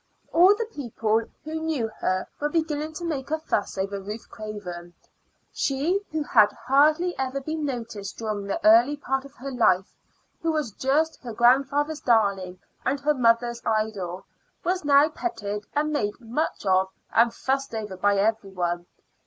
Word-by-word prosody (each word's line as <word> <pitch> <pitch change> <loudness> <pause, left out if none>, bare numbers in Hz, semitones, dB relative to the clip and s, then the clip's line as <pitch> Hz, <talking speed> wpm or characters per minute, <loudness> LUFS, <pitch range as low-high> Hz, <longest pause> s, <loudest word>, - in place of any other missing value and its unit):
All 365 +5 +7
the 460 +2 -2
people 225 - 0 0.2
who 315 +1 -4
knew 310 -8 -1
her 185 0 0
were 295 - 0
beginning 310 -1 -1
to 345 +2 -6
make 285 -5 -3
a 315 - +1
fuss 310 -12 -2
over 195 +1 -2
Ruth 210 +3 -7
Craven. 180 -5 -7 0.6
She 300 +9 0
who 310 -1 -1
had 215 -7 +5
hardly 305 +6 +4
ever 265 +1 -1
been 310 +2 -3
noticed 230 -7 -5
during 210 -3 -3
the 200 - -1
early 325 -3 +6
part 270 -1 -2
of 280 +1 -14
her 275 +2 -6
life, 195 -7 +2 0.5
who 330 - +1
was 305 -7 -1
just 290 +8 0
her 240 -3 -6
grandfather's 275 +6 +3
darling 200 -6 +2 0.3
and 275 +2 0
her 300 +1 +3
grandmother's 235 -2 +2
idol, 205 -5 -2 0.4
was 365 0 0
now 285 +1 +6
petted 210 - -4
and 300 +1 +1
made 210 -8 -1
much 240 +2 -3
of 190 0 +3 0.2
and 230 +1 +5
fussed 270 0 -2
over 210 -3 -4
by 200 +2 +2
every 215 0 +1
one. 175 -2 -2
250 Hz, 160 wpm, -25 LUFS, 205-300 Hz, 0.6 s, All